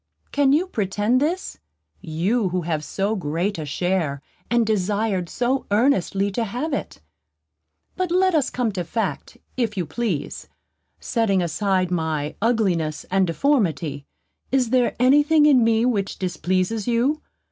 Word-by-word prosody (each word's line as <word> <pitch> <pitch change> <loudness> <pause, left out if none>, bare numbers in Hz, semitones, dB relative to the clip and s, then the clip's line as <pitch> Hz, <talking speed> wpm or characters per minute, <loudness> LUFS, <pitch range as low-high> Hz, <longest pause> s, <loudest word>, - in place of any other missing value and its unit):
Can 285 -1 +3
you 310 +6 +3
pretend 215 - 0
this; 340 +6 -2 0.4
you 185 +7 0
who 180 +1 -1
have 155 -2 -2
so 200 +6 -1
great 175 +2 -2
a 155 - -5
share, 165 -2 -1 0.3
and 235 -1 +3
desired 205 -3 0
so 250 +2 -1
earnestly 200 -3 +2
to 230 +4 -1
have 250 +9 -3
it? 275 - -4 0.9
But 370 -1 -1
let 370 +1 +3
us 300 -5 +2
come 245 -3 -1
to 185 -3 -3
fact, 220 +7 -3 0.2
if 225 -5 -1
you 180 - 0
please. 195 -4 -3 0.5
Setting 200 -6 +1
aside 185 +1 0
my 160 -4 -1
ugliness 185 -10 0
and 190 -1 +3
deformity, 165 - 0 0.4
is 255 -3 +1
there 255 -2 +2
any 260 +4 +6
thing 300 0 +4
in 270 -5 +5
me 225 0 +3
which 205 -6 -1
displeases 185 +4 -1
you? 245 +6 +1
210 Hz, 145 wpm, -23 LUFS, 180-250 Hz, 0.9 s, any